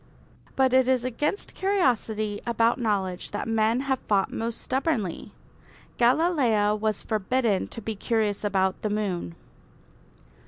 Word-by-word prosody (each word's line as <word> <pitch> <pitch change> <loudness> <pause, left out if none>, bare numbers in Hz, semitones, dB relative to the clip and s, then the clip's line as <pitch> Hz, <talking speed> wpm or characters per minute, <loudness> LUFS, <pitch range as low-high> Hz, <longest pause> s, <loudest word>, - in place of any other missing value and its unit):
But 260 -1 +3
it 260 -1 +4
is 255 -2 +2
against 295 - -2
curiosity 225 - 0
about 230 +1 +2
knowledge 195 -6 -1
that 205 - -4
men 225 +2 +2
have 265 -2 -1
fought 200 -2 +1
most 230 0 -3
stubbornly. 260 - -2 0.7
Galileo 245 -6 +3
was 215 -1 -1
forbidden 220 -1 0
to 230 - -9
be 220 0 -3
curious 215 0 -1
about 190 -2 0
the 215 - -1
moon. 190 - -2
225 Hz, 125 wpm, -26 LUFS, 205-255 Hz, 0.7 s, it